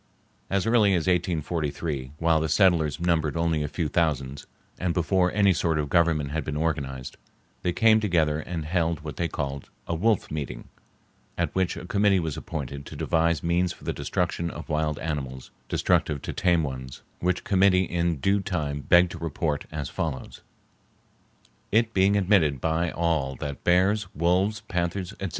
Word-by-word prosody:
As 100 Hz, 0 st, 0 dB
early 110 Hz, -4 st, +4 dB
as 85 Hz, -, 0 dB
1843, 80 Hz, -5 st, -1 dB
while 80 Hz, 0 st, +3 dB
the 80 Hz, 0 st, -1 dB
settlers 85 Hz, -5 st, +3 dB
numbered 85 Hz, -3 st, +1 dB
only 85 Hz, -2 st, +1 dB
a 75 Hz, -, -1 dB
few 80 Hz, +2 st, -2 dB
thousands, 70 Hz, -4 st, -1 dB, 0.3 s
and 90 Hz, -2 st, -1 dB
before 90 Hz, +1 st, +2 dB
any 100 Hz, -1 st, +4 dB
sort 80 Hz, -1 st, 0 dB
of 75 Hz, -2 st, -1 dB
government 80 Hz, -4 st, +2 dB
had 80 Hz, +1 st, -2 dB
been 75 Hz, -1 st, -4 dB
organized, 70 Hz, -5 st, -3 dB, 0.4 s
they 90 Hz, -, 0 dB
came 110 Hz, +4 st, +5 dB
together 80 Hz, -7 st, +1 dB
and 80 Hz, 0 st, -5 dB
held 85 Hz, -1 st, 0 dB
what 75 Hz, -1 st, -7 dB
they 85 Hz, -, 0 dB
called 70 Hz, -3 st, -4 dB, 0.2 s
"a -, -, -3 dB
wolf 105 Hz, +5 st, +1 dB
meeting," 70 Hz, -5 st, -5 dB, 0.7 s
at -, -, -1 dB
which 95 Hz, -1 st, 0 dB
a -, -, -7 dB
committee 100 Hz, -2 st, +3 dB
was 80 Hz, -4 st, -3 dB
appointed 70 Hz, -3 st, -5 dB
to -, -, -9 dB
devise 85 Hz, 0 st, +1 dB
means 85 Hz, +1 st, +1 dB
for -, -, -18 dB
the -, -, -2 dB
destruction 85 Hz, -1 st, -2 dB
of 85 Hz, +1 st, -8 dB
wild 75 Hz, -1 st, 0 dB
animals 65 Hz, -5 st, -5 dB, 0.2 s
destructive 75 Hz, -2 st, +1 dB
to -, -, -4 dB
tame 85 Hz, -3 st, +2 dB
ones, 65 Hz, -2 st, -6 dB, 0.2 s
which 90 Hz, 0 st, 0 dB
committee 95 Hz, -1 st, +4 dB
in 85 Hz, -1 st, 0 dB
due 100 Hz, +9 st, +2 dB
time 75 Hz, -7 st, -2 dB
begged 90 Hz, +3 st, +4 dB
to 85 Hz, -, -7 dB
report 80 Hz, -2 st, -2 dB
as 75 Hz, -3 st, -4 dB
follows:— 75 Hz, -2 st, -4 dB, 1.3 s
It 115 Hz, +1 st, +2 dB
being 95 Hz, +1 st, +4 dB
admitted 90 Hz, -8 st, +3 dB
by 80 Hz, +4 st, 0 dB
all 80 Hz, -5 st, 0 dB
that 70 Hz, +1 st, -6 dB
bears, 95 Hz, +3 st, +3 dB
wolves, 90 Hz, +7 st, +1 dB
panthers, 90 Hz, -2 st, -2 dB
etc. -, -, -3 dB
85 Hz, 170 wpm, -26 LUFS, 75-90 Hz, 1.3 s, came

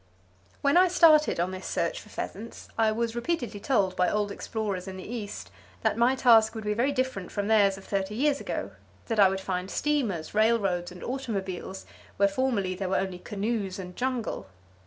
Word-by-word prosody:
When 280 Hz, +4 st, +4 dB
I 370 Hz, +1 st, +7 dB
started 315 Hz, -, +5 dB
on 175 Hz, +2 st, 0 dB
this 185 Hz, 0 st, -6 dB
search -, -, -1 dB
for -, -, -16 dB
pheasants 225 Hz, +4 st, -7 dB
I 220 Hz, -1 st, +3 dB
was 230 Hz, +1 st, -2 dB
repeatedly 240 Hz, -4 st, -2 dB
told 200 Hz, -6 st, +1 dB
by 180 Hz, -1 st, +2 dB
old 210 Hz, -1 st, 0 dB
explorers 200 Hz, -3 st, -4 dB
in 190 Hz, 0 st, -6 dB
the 185 Hz, -, -8 dB
east 205 Hz, -, -6 dB, 0.3 s
that -, -, +2 dB
my 240 Hz, +3 st, +3 dB
task 225 Hz, -3 st, +5 dB
would 220 Hz, -, -5 dB
be 210 Hz, 0 st, 0 dB
very 245 Hz, +6 st, +1 dB
different 255 Hz, -9 st, -2 dB
from 205 Hz, -, -2 dB
theirs 200 Hz, -3 st, +4 dB
of 195 Hz, -, -12 dB
thirty 195 Hz, +1 st, -2 dB
years 285 Hz, +3 st, +1 dB
ago; -, -, -4 dB, 0.4 s
that 225 Hz, -2 st, 0 dB
I 195 Hz, -2 st, +7 dB
would 190 Hz, 0 st, -2 dB
find 185 Hz, -1 st, -3 dB
steamers, 230 Hz, -, -1 dB
railroads 205 Hz, -5 st, +2 dB
and 180 Hz, -, -10 dB
automobiles 195 Hz, -7 st, -4 dB, 0.3 s
where 200 Hz, -, +5 dB
formerly 200 Hz, -4 st, 0 dB
were 190 Hz, 0 st, -1 dB
only 190 Hz, -2 st, -1 dB
canoes 205 Hz, -1 st, -3 dB
and 180 Hz, -2 st, -8 dB
jungle. 250 Hz, -, -2 dB
210 Hz, 185 wpm, -27 LUFS, 190-240 Hz, 0.4 s, I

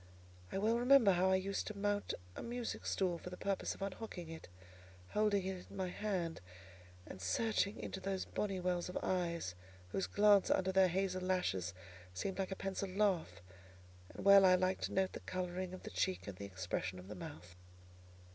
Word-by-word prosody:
I -, -, -2 dB
well 220 Hz, +4 st, +2 dB
remember 245 Hz, -4 st, +7 dB
how 185 Hz, +1 st, +3 dB
I 190 Hz, -, +5 dB
used 195 Hz, +1 st, -1 dB
to 215 Hz, -, -5 dB
mount 205 Hz, 0 st, 0 dB, 0.2 s
a -, -, -5 dB
music 240 Hz, 0 st, -4 dB
stool 180 Hz, -3 st, 0 dB
for 180 Hz, -, -7 dB
the 180 Hz, -, -8 dB
purpose 195 Hz, 0 st, -1 dB
of -, -, -6 dB
unhooking 195 Hz, -3 st, -5 dB
it, 160 Hz, -, -9 dB, 0.6 s
holding 210 Hz, -3 st, +2 dB
it 190 Hz, -1 st, -4 dB
in 200 Hz, -, -10 dB
my 185 Hz, -1 st, -1 dB
hand, 180 Hz, -, -2 dB, 0.6 s
and -, -, -9 dB
searching 200 Hz, -, +1 dB
into 190 Hz, -, -5 dB
those 190 Hz, 0 st, -2 dB
bonny 195 Hz, -3 st, -2 dB
wells 180 Hz, -1 st, -1 dB
of 180 Hz, -, -3 dB
eyes, 170 Hz, -, -1 dB, 0.4 s
whose 190 Hz, -, -1 dB
glance 205 Hz, -1 st, +5 dB
under 190 Hz, 0 st, +2 dB
their 190 Hz, 0 st, +5 dB
hazel 185 Hz, +1 st, 0 dB
lashes 95 Hz, -, 0 dB, 0.4 s
seemed 190 Hz, -, -3 dB
like 190 Hz, -, 0 dB
a 190 Hz, -, -3 dB
pencilled 195 Hz, 0 st, -3 dB
laugh; 190 Hz, -, +1 dB, 0.7 s
and -, -, -8 dB
well 200 Hz, 0 st, +9 dB
I 185 Hz, -1 st, +7 dB
liked 185 Hz, +1 st, +1 dB
to -, -, -5 dB
note 190 Hz, 0 st, +1 dB
the -, -, -5 dB
colouring 185 Hz, 0 st, -3 dB
of 185 Hz, -, -8 dB
the -, -, -7 dB
cheek, 95 Hz, 0 st, -1 dB
and 100 Hz, -, -5 dB
the 100 Hz, -, -7 dB
expression 95 Hz, -1 st, -3 dB
of 90 Hz, +1 st, -10 dB
the 105 Hz, -, -6 dB
mouth." 105 Hz, -, -9 dB
185 Hz, 190 wpm, -37 LUFS, 170-200 Hz, 0.7 s, well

